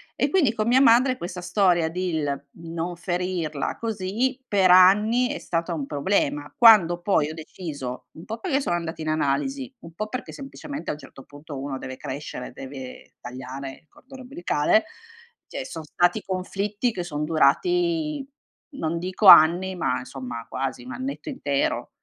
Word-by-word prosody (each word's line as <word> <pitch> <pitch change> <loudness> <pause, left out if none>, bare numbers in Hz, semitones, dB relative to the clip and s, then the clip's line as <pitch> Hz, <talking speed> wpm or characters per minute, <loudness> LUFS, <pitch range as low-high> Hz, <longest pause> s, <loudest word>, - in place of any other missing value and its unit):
E - - 0
quindi 320 - +3
con 215 0 -2
mia 255 +3 +5
madre 255 +1 +5
questa 180 -1 -6
storia 175 -4 +2
del 160 -5 -2
non 170 +1 -4
ferirla 175 -4 -3
così, 230 +5 -2
per 195 -5 +4
anni 210 +7 +6
è 290 - -3
stata 170 0 -2
un 145 -4 -3
problema. 145 -1 -1
Quando 205 -8 +7
poi 160 -6 +2
ho 160 - -7
deciso 150 -6 -7
un 160 - -12
po' 225 +1 -6
perché 290 -7 0
sono 175 - 0
andata 165 -1 -6
in 155 0 -3
analisi, 250 - -1
un 165 0 -12
po' 215 +5 -4
perché 255 - -5
semplicemente 285 +1 -7
a - - 0
un 150 - -10
certo 135 0 -13
punto 145 0 -10
uno 135 -1 -4
deve 130 0 -7
crescere, 130 -2 -6
deve 130 0 -10
tagliare 130 +2 -7
il 155 - -39
cordone 260 0 -14
ombelicale; 215 - +1 0.6
cioè 265 - -6
son 165 -11 -7
stati 175 +6 +1
conflitti 200 +5 -2
che 180 -5 -4
sono 150 -3 -4
durati 305 - +1 0.5
non 160 +1 -2
dico 185 +4 0
anni, 180 +4 +8
ma 165 -7 -1
insomma 125 -3 -7
quasi 130 -1 -3
1 125 - -8
annetto 275 +3 -5
intero. 145 - -1
175 Hz, 165 wpm, -24 LUFS, 150-230 Hz, 0.6 s, anni